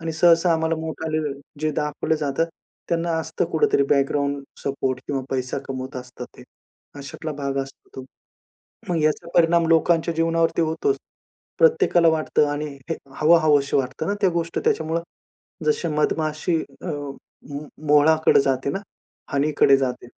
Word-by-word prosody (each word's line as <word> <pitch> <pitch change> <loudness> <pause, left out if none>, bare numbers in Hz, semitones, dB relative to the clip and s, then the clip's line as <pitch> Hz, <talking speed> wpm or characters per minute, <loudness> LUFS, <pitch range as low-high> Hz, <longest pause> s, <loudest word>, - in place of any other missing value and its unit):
आणि 165 0 -3
सहसा 165 +1 +4
आम्हाला 160 0 0
मोठाले 160 0 -3 0.4
जे 155 0 +1
दाखवलं 150 +2 -1
जातात, 150 +2 -1 0.4
त्यांना 170 0 0
असतं 160 0 -2
कुठेतरी 155 -3 +3
बॅकग्राऊंड 140 0 +1 0.2
सपोर्ट 135 -2 -1
किंवा 135 -2 -2
पैसा 130 -1 -2
कमवत 130 -1 -5
असतात 125 0 -8
ते, - - -12 0.6
अशातला 150 +3 -6
भाग 140 -1 -3
असतो 135 - -14
तो. 130 - -6 0.8
मग 170 -2 0
याचा 155 +2 0
परिणाम 170 0 +4
लोकांच्या 165 0 +3
जीवनावरती 165 0 +1
होतोच. 165 - 0 0.6
प्रत्येकाला 405 - +4
वाटतं 155 -1 +2
आणि 145 +1 -3 0.2
हे - - +1 0.2
हवं-हवंशी 150 -3 +4
वाटतं 135 +4 -2
ना, 200 - 0
त्या 190 -3 +3
गोष्ट 170 0 -2
त्याच्यामुळं. 160 +1 +1 0.7
जशी 160 +3 +1
मधमाशी 155 +2 0 0.3
अ, - - -7 0.6
मो 140 0 -4 0.3
मोहळाकडे 155 +1 +5
जाते 135 0 0
ना 195 - -2 0.5
हनीकडे 140 -1 +4
जाते. 125 -2 -3
155 Hz, 135 wpm, -23 LUFS, 140-165 Hz, 0.8 s, मोहळाकडे